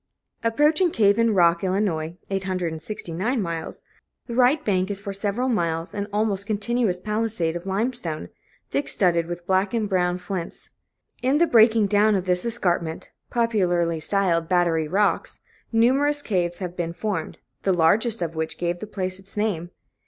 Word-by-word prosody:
Approaching 300 Hz, +10 st, +3 dB
Cave 205 Hz, -6 st, +3 dB
in 230 Hz, -2 st, +3 dB
Rock, 170 Hz, -1 st, +4 dB
Ill. 190 Hz, 0 st, +1 dB, 0.6 s
(869 185 Hz, +3 st, -2 dB
miles), 170 Hz, -5 st, -4 dB, 0.4 s
the 235 Hz, -, -6 dB
right 255 Hz, +5 st, +3 dB
bank 190 Hz, -2 st, +1 dB
is 200 Hz, -1 st, -3 dB
for 200 Hz, 0 st, -6 dB
several 205 Hz, +5 st, -1 dB
miles 170 Hz, -7 st, -1 dB
an 205 Hz, -1 st, -3 dB
almost 205 Hz, -1 st, 0 dB
continuous 215 Hz, -2 st, 0 dB
palisade 210 Hz, -5 st, -1 dB
of 175 Hz, +2 st, -6 dB
lime 215 Hz, +7 st, 0 dB
stone, 165 Hz, -11 st, -5 dB, 0.4 s
thick 285 Hz, -, -1 dB
studded 170 Hz, -5 st, +2 dB
with 175 Hz, 0 st, -6 dB
black 190 Hz, +4 st, +1 dB
and 220 Hz, -2 st, 0 dB
brown 180 Hz, -2 st, +1 dB
flints. 180 Hz, -1 st, -6 dB, 0.5 s
In 260 Hz, +3 st, +2 dB
the 340 Hz, -, +5 dB
breaking 225 Hz, -5 st, +5 dB
down 205 Hz, +1 st, +3 dB
of 190 Hz, -1 st, -1 dB
this 180 Hz, -1 st, +2 dB
escarpment, 175 Hz, -8 st, -2 dB, 0.2 s
popularly 180 Hz, -8 st, +1 dB
styled 170 Hz, -1 st, +1 dB
Battery 170 Hz, -3 st, +2 dB
Rocks, 200 Hz, +5 st, 0 dB, 0.3 s
numerous 275 Hz, +6 st, +3 dB
caves 175 Hz, -4 st, -1 dB
have 180 Hz, -2 st, -5 dB
been 170 Hz, -1 st, -3 dB
formed, 175 Hz, -3 st, -3 dB, 0.2 s
the 195 Hz, -, +1 dB
largest 200 Hz, +6 st, +2 dB
of 165 Hz, -1 st, -3 dB
which 160 Hz, 0 st, -3 dB
gave 175 Hz, 0 st, -2 dB
the 215 Hz, -, -6 dB
place 185 Hz, -2 st, -3 dB
its 195 Hz, +2 st, -5 dB
name. 195 Hz, -6 st, -1 dB
195 Hz, 160 wpm, -24 LUFS, 175-220 Hz, 0.6 s, the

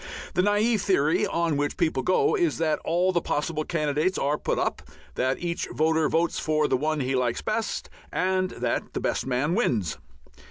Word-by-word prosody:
The -, -, +3 dB
naive 205 Hz, +2 st, +2 dB
theory 160 Hz, -6 st, +2 dB
on 165 Hz, -3 st, 0 dB
which 145 Hz, 0 st, -1 dB
people 160 Hz, -6 st, +1 dB
go 425 Hz, -, +2 dB
is 350 Hz, -5 st, +1 dB
that 160 Hz, -2 st, +1 dB
all 175 Hz, +3 st, +2 dB
the 175 Hz, -2 st, +1 dB
possible 155 Hz, +1 st, -1 dB
candidates 155 Hz, +3 st, 0 dB
are 145 Hz, +2 st, +1 dB
put -, -, -1 dB
up, -, -, -1 dB, 0.3 s
that 130 Hz, +1 st, 0 dB
each 170 Hz, -1 st, -3 dB
voter 160 Hz, 0 st, +2 dB
votes 170 Hz, +1 st, +1 dB
for 155 Hz, -1 st, +1 dB
the -, -, +2 dB
one 155 Hz, +3 st, 0 dB
he 130 Hz, +1 st, -1 dB
likes 125 Hz, -2 st, 0 dB
best, 220 Hz, +1 st, -2 dB, 0.2 s
and 185 Hz, 0 st, +1 dB
that 120 Hz, -7 st, -3 dB
the -, -, -2 dB
best -, -, -1 dB
man 135 Hz, +5 st, 0 dB
wins. 110 Hz, -, 0 dB
160 Hz, 185 wpm, -26 LUFS, 145-185 Hz, 0.3 s, The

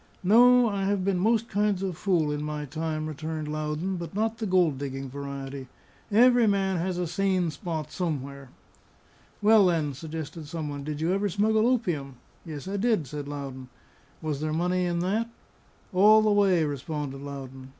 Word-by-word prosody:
"No. 245 Hz, +5 st, +6 dB
I 200 Hz, -2 st, -1 dB
have 195 Hz, -2 st, 0 dB
been 195 Hz, -2 st, +1 dB
most 225 Hz, +3 st, +2 dB
kinds 205 Hz, -1 st, 0 dB
of 185 Hz, -3 st, -2 dB
fool 170 Hz, -4 st, +1 dB
in 150 Hz, 0 st, -2 dB
my 150 Hz, 0 st, -4 dB
time," 155 Hz, +2 st, -3 dB
returned 155 Hz, 0 st, -4 dB
Loudon, 155 Hz, +5 st, -2 dB
"but 170 Hz, +2 st, -7 dB
not 220 Hz, +1 st, -1 dB
the 220 Hz, -, -2 dB
gold 175 Hz, -7 st, +2 dB
digging 135 Hz, -1 st, -5 dB
variety. 140 Hz, -1 st, -6 dB, 0.4 s
Every 240 Hz, +2 st, +5 dB
man 195 Hz, -2 st, +1 dB
has 180 Hz, +1 st, -2 dB
a 180 Hz, -, -1 dB
sane 185 Hz, 0 st, 0 dB
spot 160 Hz, 0 st, -5 dB
somewhere." 140 Hz, -6 st, -4 dB, 0.9 s
"Well, 210 Hz, -2 st, +6 dB
then," 160 Hz, -5 st, 0 dB
suggested 155 Hz, +1 st, -7 dB
some 155 Hz, -1 st, -4 dB
one, 145 Hz, -1 st, -5 dB
"did 150 Hz, +1 st, -5 dB
you 170 Hz, +3 st, +1 dB
ever 200 Hz, +1 st, 0 dB
smuggle 215 Hz, +4 st, +2 dB
opium?" 170 Hz, -, -1 dB, 0.3 s
"Yes, 155 Hz, -1 st, -7 dB
I 200 Hz, +1 st, -2 dB
did," 215 Hz, -6 st, +1 dB
said 145 Hz, +2 st, -6 dB
Loudon. 135 Hz, -3 st, -7 dB, 0.5 s
"Was 150 Hz, -2 st, -2 dB
there 155 Hz, 0 st, -1 dB
money 180 Hz, +3 st, 0 dB
in 170 Hz, -1 st, -1 dB
that?" 215 Hz, +6 st, 0 dB, 0.6 s
"All 215 Hz, +4 st, +6 dB
the 215 Hz, -, +3 dB
way," 195 Hz, -5 st, +4 dB
responded 145 Hz, -1 st, -4 dB
Loudon. 135 Hz, -2 st, -8 dB
165 Hz, 170 wpm, -27 LUFS, 145-195 Hz, 0.9 s, No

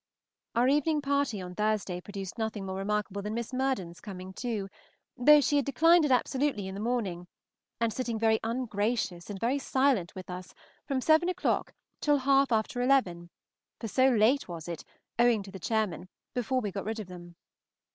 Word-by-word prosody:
Our 240 Hz, +2 st, +4 dB
evening 295 Hz, +2 st, +2 dB
party 280 Hz, -6 st, 0 dB
on 180 Hz, 0 st, -7 dB
Thursday 210 Hz, -3 st, -1 dB
produced 195 Hz, -1 st, -7 dB
nothing 220 Hz, -3 st, -2 dB
more 190 Hz, 0 st, -4 dB
remarkable 205 Hz, 0 st, -2 dB
than 210 Hz, +2 st, -4 dB
Miss 235 Hz, +2 st, -4 dB
Murden's 255 Hz, -10 st, -2 dB
coming 190 Hz, -2 st, -8 dB
too, 220 Hz, -3 st, -3 dB, 0.5 s
though 295 Hz, +4 st, +7 dB
she 290 Hz, +1 st, +2 dB
had 280 Hz, -, +1 dB
declined 330 Hz, +4 st, +5 dB
it 285 Hz, -, 0 dB
absolutely 260 Hz, -4 st, +1 dB
in 190 Hz, -, -6 dB
the 200 Hz, -, -5 dB
morning, 205 Hz, -7 st, -2 dB, 0.5 s
and 230 Hz, -1 st, +1 dB
sitting 240 Hz, -3 st, -2 dB
very 220 Hz, 0 st, +3 dB
ungracious 220 Hz, -6 st, -2 dB
and 200 Hz, -2 st, -5 dB
very 245 Hz, +6 st, +1 dB
silent 260 Hz, -9 st, +1 dB
with 185 Hz, -1 st, -8 dB
us 180 Hz, 0 st, -8 dB, 0.3 s
from 270 Hz, -2 st, 0 dB
seven 320 Hz, +5 st, +4 dB
o'clock 365 Hz, -, -1 dB, 0.3 s
till 295 Hz, -1 st, +3 dB
half 275 Hz, 0 st, +3 dB
after 225 Hz, +2 st, 0 dB
eleven, 190 Hz, -10 st, +2 dB, 0.5 s
for 225 Hz, -, -4 dB
so 260 Hz, +5 st, +4 dB
late 245 Hz, +4 st, +3 dB
was 170 Hz, -2 st, -7 dB
it, 170 Hz, -2 st, -5 dB, 0.4 s
owing 235 Hz, -3 st, +4 dB
to 195 Hz, -, -11 dB
the 190 Hz, -, -8 dB
chairmen, 210 Hz, -3 st, -1 dB, 0.2 s
before 255 Hz, +1 st, 0 dB
we 205 Hz, -3 st, -3 dB
got 195 Hz, +1 st, -5 dB
rid 220 Hz, +1 st, -3 dB
of 215 Hz, -, -5 dB
them. 175 Hz, -1 st, -11 dB
225 Hz, 180 wpm, -29 LUFS, 195-265 Hz, 0.5 s, though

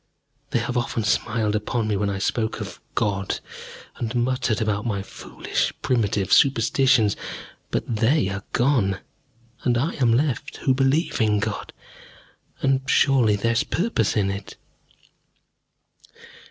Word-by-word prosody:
They -, -, +1 dB
have 125 Hz, -, -1 dB
often 120 Hz, -2 st, -1 dB
smiled 110 Hz, 0 st, 0 dB
upon 110 Hz, +2 st, -1 dB
me 105 Hz, -, 0 dB
when 100 Hz, +1 st, 0 dB
I 100 Hz, -, -2 dB
spoke 110 Hz, +3 st, -1 dB
of -, -, -7 dB
God, 100 Hz, -2 st, -1 dB, 0.6 s
and 115 Hz, +1 st, -3 dB
muttered 120 Hz, -2 st, 0 dB
about 105 Hz, -2 st, 0 dB
my 100 Hz, -5 st, -2 dB
foolish, -, -, -3 dB
primitive 105 Hz, -5 st, +1 dB
superstitions. 130 Hz, -3 st, +4 dB, 0.5 s
But 115 Hz, -, -2 dB
they 115 Hz, +1 st, +3 dB
are 100 Hz, 0 st, -5 dB
gone, 120 Hz, -7 st, +2 dB, 0.6 s
and 120 Hz, -1 st, +1 dB
I 145 Hz, +8 st, 0 dB
am 120 Hz, -3 st, +4 dB
left 140 Hz, +3 st, 0 dB
who 130 Hz, -, +4 dB
believe 135 Hz, +3 st, +1 dB
in 105 Hz, -1 st, +3 dB
God, 105 Hz, 0 st, -3 dB, 0.9 s
and 135 Hz, -1 st, +3 dB
surely 125 Hz, -7 st, +4 dB
there 115 Hz, +3 st, 0 dB
is 115 Hz, -, +2 dB
purpose 170 Hz, -, 0 dB
in 100 Hz, -2 st, +2 dB
it. 100 Hz, 0 st, -7 dB
115 Hz, 135 wpm, -23 LUFS, 105-130 Hz, 0.9 s, superstitions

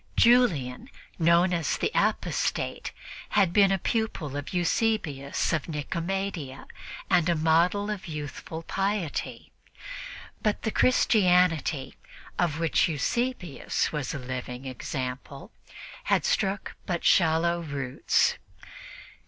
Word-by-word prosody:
Julian, 185 Hz, -, +3 dB, 0.3 s
known 170 Hz, +2 st, +4 dB
as 165 Hz, -4 st, 0 dB
"the -, -, -1 dB
Apostate," -, -, -1 dB, 0.4 s
had 190 Hz, -4 st, +3 dB
been 200 Hz, -2 st, +5 dB
a 195 Hz, -, +2 dB
pupil 190 Hz, -, -2 dB
of 145 Hz, 0 st, -5 dB
Eusebius 175 Hz, -7 st, 0 dB
of 160 Hz, -4 st, -1 dB
Nicomedia 165 Hz, -1 st, -3 dB, 0.4 s
and 175 Hz, -1 st, +3 dB
a 170 Hz, -, +3 dB
model 170 Hz, +6 st, +2 dB
of 200 Hz, -4 st, -5 dB
youthful 150 Hz, +1 st, -6 dB
piety; 195 Hz, -4 st, -3 dB, 0.9 s
but 210 Hz, -2 st, 0 dB
the 220 Hz, -, 0 dB
Christianity 180 Hz, -, +3 dB, 0.4 s
of 170 Hz, -4 st, +1 dB
which 165 Hz, +2 st, +2 dB
Eusebius 175 Hz, -, -1 dB
was 150 Hz, -1 st, -3 dB
a -, -, -2 dB
living 125 Hz, 0 st, -6 dB
example 130 Hz, +1 st, -5 dB, 0.5 s
had -, -, +2 dB
struck 195 Hz, +1 st, -1 dB
but 175 Hz, -2 st, -2 dB
shallow 170 Hz, 0 st, +3 dB
roots. 140 Hz, -5 st, 0 dB
165 Hz, 105 wpm, -27 LUFS, 145-195 Hz, 0.9 s, been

